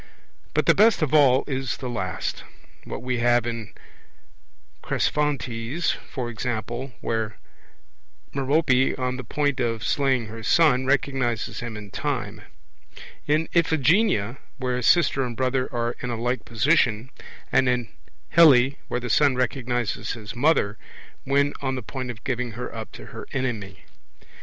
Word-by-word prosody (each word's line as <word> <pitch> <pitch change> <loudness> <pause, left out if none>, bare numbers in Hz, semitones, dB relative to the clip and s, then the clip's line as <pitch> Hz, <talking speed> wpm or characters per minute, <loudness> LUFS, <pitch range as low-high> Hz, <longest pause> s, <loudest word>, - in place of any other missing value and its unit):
But - - +2
the - - +6
best 215 -5 +4
of 150 -1 -1
all 135 -4 +5
is 135 -2 -3
the 130 - -5
last; 95 -8 -3 0.4
what - - -6
we 125 -1 -1
have 120 0 +3
in 115 -2 -4 1.1
Cresphontes, 140 0 -1 0.2
for 125 -3 -4
example, 120 +2 -4
where 110 -2 -2 1.0
Merope, 135 -1 +2
on 130 0 -2
the 130 - -6
point 145 +1 -1
of 115 -3 -1
slaying 135 -4 +1
her 115 +1 -8
son, 130 -1 +3
recognizes 135 -5 0
him 120 -4 -5
in 105 -2 -10
time; - - -3 0.9
in 155 +2 +2
Iphigenia, 160 - +2 0.2
where 125 -2 -1
sister 140 0 +3
and 120 -3 -5
brother 130 0 0
are 120 -1 -1
in 125 - -4
a 115 -2 -3
like 120 -1 -1
position; 120 -1 +2 0.4
and 130 - +3
in 125 -2 0 0.4
Helle, 135 -6 +6 0.2
where 125 - -2
the 125 - -5
son 140 +3 +3
recognizes 125 -2 -1
his 110 -1 -8
mother, 120 -6 +2 0.5
when 140 +1 +2
on 130 -1 -1
the 130 - -5
point 130 +2 -5
of 120 -2 -7
giving 125 -3 -2
her 125 +3 -6
up 110 -1 -7
to - - -10
her - - -8
enemy. 115 -7 -3
125 Hz, 145 wpm, -24 LUFS, 115-140 Hz, 1.1 s, the